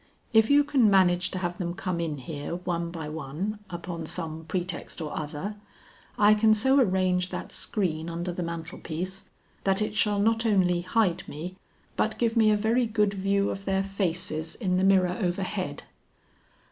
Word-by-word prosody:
If 220 -1 +5
you 290 +1 +6
can 265 -6 +3
manage 185 -2 +4
to 185 - -5
have 175 -1 -3
them 175 -1 -2
come 180 -2 -2
in 160 -3 -2
here 145 +3 -5
one 170 -1 -2
by 165 -3 -6
one 160 +8 -4
upon 170 -2 -5
some 160 -2 -4
pretext 180 +3 -3
or 155 -3 -4
other, 155 +7 -4 0.6
I 210 0 +6
can 215 +1 +4
so 265 +6 +4
arrange 185 -5 +2
that - - -6
screen 170 -6 -2
under 175 +1 -3
the 180 - -4
mantel 170 0 -5
piece, 185 +4 -5 0.4
that 195 0 +2
it 215 0 -1
shall 210 -1 +2
not 225 +2 +2
only 185 -6 +3
hide 185 0 +1
me, 170 +5 -6 0.4
but 220 - +1
give 230 -1 +1
me 220 -2 +5
a 210 - +4
very 230 +3 +2
good 210 -2 +1
view 200 +1 +1
of 195 0 -6
their 195 0 +1
faces 180 -5 -2
in 185 -5 0
the 185 - +1
mirror 185 -2 +4
overhead." 185 -3 -2
185 Hz, 175 wpm, -27 LUFS, 170-210 Hz, 0.6 s, you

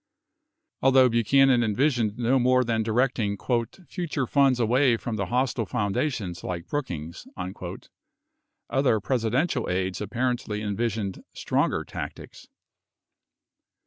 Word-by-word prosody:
25 - - +1
Although 130 -1 +6
Buchanan 120 +2 +4
envisioned 115 -1 +1
no 125 +2 +2
more 130 +1 +4
than 115 -2 0
directing 110 -2 0 0.3
"... 180 +8 -21
future 165 -7 -2
funds 135 -1 +3
away 120 +1 +3
from 115 0 -4
the 100 -3 -2
hostile 125 -1 0
foundations, 100 - -2
like 85 -2 -4
Brookings," 85 - -5
26 90 0 -7 0.8
other 130 -5 +2
Presidential 125 - 0
aides 95 +1 -1
apparently 115 +1 -2
envisioned 105 -1 -2
stronger - - 0
tactics. - - -8
120 Hz, 115 wpm, -26 LUFS, 100-130 Hz, 0.8 s, Although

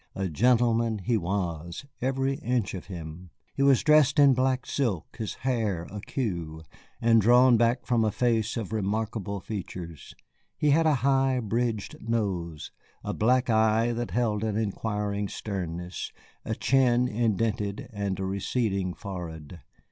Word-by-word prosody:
A 95 -1 -2
gentleman 115 +3 +2
he 105 +4 -1
was, 85 - -3 0.2
every 135 +1 0
inch 120 -3 -1
of 90 -3 -7
him. 85 -1 -8 0.2
He - - -3
was 140 -2 +4
dressed 150 -1 +5
in 140 -2 +7
black 130 0 +1
silk, 110 - -2
his 110 -3 -4
hair 110 -9 0
in 95 - -11
a 105 - -5
cue, 85 - -4 0.4
and 115 -1 +4
drawn 120 +2 +5
away 115 +1 +4
from 120 -3 +1
a 110 - +1
face 115 -2 0
of 110 -2 -4
remarkable 105 0 -2
features. 90 -6 -7 0.4
He 150 - +2
had 160 +2 +4
a 155 - +4
high 135 -1 +3
bridged 115 -1 -2
nose, 95 -9 -2 0.3
a - - -3
black 125 +3 +2
eye 110 +1 +3
that 120 0 -3
held 110 -3 0
an 110 -2 -1
inquiring 105 -1 -2
sternness, 90 -4 -5 0.3
a - - -3
chin 125 -2 +3
indented, 110 -2 -1
and 100 -2 -2
a 95 - -2
receding 95 -1 -1
forehead. 85 -4 -7
110 Hz, 150 wpm, -27 LUFS, 95-120 Hz, 0.4 s, in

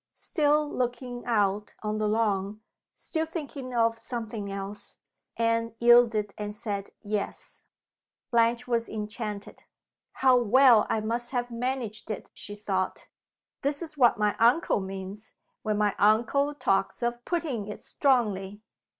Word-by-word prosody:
Still 300 -1 +2
looking 245 -2 -3
out 210 -3 +1
on 215 0 -1
the 215 - +1
lawn 210 -1 0 0.3
still 320 -1 -3
thinking 290 -5 -6
of 230 -1 +2
something 225 -5 -5
else 195 +1 -7 0.4
Anne 230 0 +1
yielded, 235 -3 +5
and 210 0 -4
said 205 -3 -4
"Yes." 210 -1 -4 0.7
Blanche 235 +1 +2
was 235 -1 0
enchanted. 210 -1 -5 0.5
"How 260 -2 +4
well 245 0 +6
I 220 - +1
must 235 +2 -2
have 245 -1 -1
managed 235 -3 -3
it!" 215 - -5
she 205 - -8
thought. 195 -3 -2 0.5
"This 285 +4 -1
is 310 -2 -7
what 250 -5 +4
my 210 -1 +1
uncle 240 - +4
means, 195 +2 -7 0.3
when 215 -1 -1
my 210 -1 +2
uncle 240 +8 +3
talks 195 -3 0
of 240 0 -1
'putting 285 - -2
it 210 - -8
strongly. 210 -7 0
230 Hz, 135 wpm, -28 LUFS, 210-245 Hz, 0.7 s, well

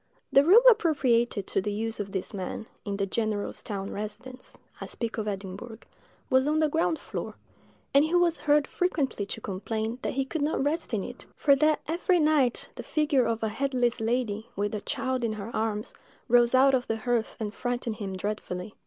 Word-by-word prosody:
The 275 - +7
room 400 +10 +7
appropriated 255 - +3
to - - 0
the 205 - -2
use 225 +2 -2
of 200 -1 -4
this 190 +1 -3
man, 195 +2 -4 0.2
in 200 -1 -2
the 200 - 0
general's 215 0 -2
town 195 -1 -5
residence 215 +5 -6 0.2
(I - - -5
speak 230 -1 -4
of 215 - -3
Edinburgh), 200 +3 -5 0.5
was 260 0 +3
on 305 +1 +2
the 310 -1 +3
ground 320 +1 +1
floor; - - -6 0.6
and 280 +1 +6
he 315 +3 0
was 350 -2 +3
heard 295 -1 +3
frequently 280 - -1
to 225 - -5
complain 220 +4 -3
that - - -2
he 270 0 0
could 315 +3 -3
not 295 -1 0
rest 295 -4 -1
in 200 - -1
it, 245 - -9
for 280 -2 +4
that 305 +2 +3
every 350 +3 +2
night 300 -6 +2
the - - -7
figure 290 -6 +1
of 230 -1 -1
a 220 - +1
headless 245 0 0
lady, 225 -2 -1
with 205 +1 -1
a 210 - -3
child 260 +2 -2
in 225 -2 0
her 215 +2 -6
arms, 215 -1 -2 0.3
rose 240 +1 +5
out 270 +1 +6
of 250 -1 +1
the 225 - -1
hearth 235 0 -1
and 210 -2 -3
frightened 245 -3 -3
him 195 -4 -4
dreadfully. 200 -1 -4
235 Hz, 195 wpm, -28 LUFS, 210-280 Hz, 0.6 s, The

